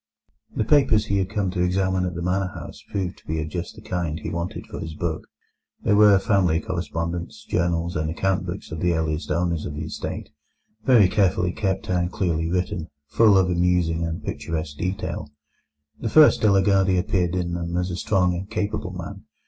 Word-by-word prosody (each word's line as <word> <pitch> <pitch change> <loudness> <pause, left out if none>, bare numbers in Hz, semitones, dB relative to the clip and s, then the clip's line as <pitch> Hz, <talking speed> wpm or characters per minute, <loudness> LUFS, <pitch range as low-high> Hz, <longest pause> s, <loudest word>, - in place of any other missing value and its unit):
The - - +1
papers 120 -4 +4
he 100 -2 +1
had 95 -1 -1
come 100 -3 -1
to 90 -1 -2
examine 95 +1 +1
at 90 -1 -3
the 85 - -4
manor 95 +2 0
house - - -9
proved 95 -3 -3
to - - -28
be 80 0 -1
of 80 0 -3
just 85 +1 -5
the - - -13
kind 85 -4 -2
he - - -5
wanted 85 +1 -4
for - - -8
his 80 -1 -6
book. 80 -1 -3 0.6
There 105 - +3
were 105 -1 +7
family 95 -4 +2
correspondence, 85 -1 -4
journals, 85 0 0
and 80 0 -1
account 95 +2 0
books 90 +1 -6
of 80 - -4
the 90 +1 +2
earliest 80 -1 -2
owners 85 -2 0
of 75 - -6
the 75 +1 -4
estate, 80 - -5 0.6
very 120 -7 +6
carefully 90 -2 +2
kept 95 0 -2
and 90 -1 0
clearly 85 -4 -1
written, 90 -2 -2 0.2
full 110 -4 +5
of 95 - +4
amusing 85 -2 +1
and 80 0 -3
picturesque 80 +1 -4
detail. 90 -4 -3 0.7
The 115 - -2
first 155 +5 +6
De 110 - +5
la 95 0 +5
Gardie 95 -1 +3
appeared 90 -2 0
in 85 -1 -1
them 85 0 -3
as 90 +1 -1
a - - -3
strong 90 -1 +1
and 95 +3 -5
capable 105 -3 -2
man. 95 +3 -7
90 Hz, 195 wpm, -24 LUFS, 85-95 Hz, 0.7 s, were